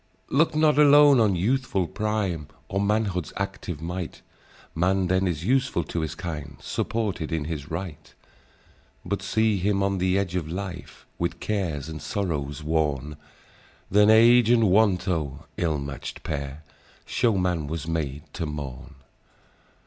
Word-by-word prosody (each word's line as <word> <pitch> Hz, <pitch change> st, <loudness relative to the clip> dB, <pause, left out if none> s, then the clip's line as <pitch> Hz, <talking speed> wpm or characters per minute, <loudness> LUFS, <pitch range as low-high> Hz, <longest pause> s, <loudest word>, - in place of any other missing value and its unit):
"Look 155 Hz, +3 st, +3 dB
not 155 Hz, -1 st, +4 dB
alone 145 Hz, -2 st, +7 dB
on 105 Hz, -4 st, +3 dB
youthful 105 Hz, 0 st, 0 dB
prime, 100 Hz, -8 st, -2 dB, 0.2 s
Or 95 Hz, -, 0 dB
manhood's 100 Hz, -5 st, 0 dB
active 80 Hz, -3 st, -4 dB
might; 90 Hz, 0 st, -5 dB, 0.5 s
Man 95 Hz, +3 st, +1 dB
then 95 Hz, +1 st, +1 dB
is 85 Hz, -1 st, -2 dB
useful 130 Hz, -7 st, +1 dB
to 85 Hz, -, -4 dB
his 80 Hz, -2 st, -3 dB
kind, 75 Hz, -6 st, -6 dB
Supported 100 Hz, -8 st, -2 dB
in 80 Hz, -2 st, -1 dB
his 75 Hz, -2 st, -5 dB
right: 85 Hz, -2 st, -6 dB, 0.9 s
But 100 Hz, +2 st, -2 dB
see 105 Hz, +2 st, +1 dB
him 100 Hz, +1 st, +1 dB
on 100 Hz, -1 st, 0 dB
the 95 Hz, +1 st, +2 dB
edge 95 Hz, -3 st, -1 dB
of 80 Hz, -4 st, -2 dB
life, 90 Hz, -1 st, -7 dB
With 85 Hz, 0 st, -2 dB
cares 85 Hz, -9 st, -2 dB
and 80 Hz, -1 st, -7 dB
sorrows 75 Hz, -7 st, -3 dB
worn; 75 Hz, -2 st, -1 dB, 0.8 s
Then 105 Hz, +2 st, +5 dB
Age 115 Hz, +1 st, +6 dB
and 115 Hz, -5 st, +4 dB
Want—oh! 90 Hz, -8 st, +1 dB
ill 80 Hz, -3 st, 0 dB
match'd 70 Hz, 0 st, -6 dB
pair— 70 Hz, 0 st, -4 dB, 0.4 s
Shew 115 Hz, -5 st, +1 dB
man 90 Hz, -5 st, 0 dB
was 80 Hz, 0 st, -4 dB
made 75 Hz, -3 st, -2 dB
to 85 Hz, -, -3 dB
mourn. 70 Hz, -4 st, -7 dB
90 Hz, 140 wpm, -25 LUFS, 80-105 Hz, 0.9 s, alone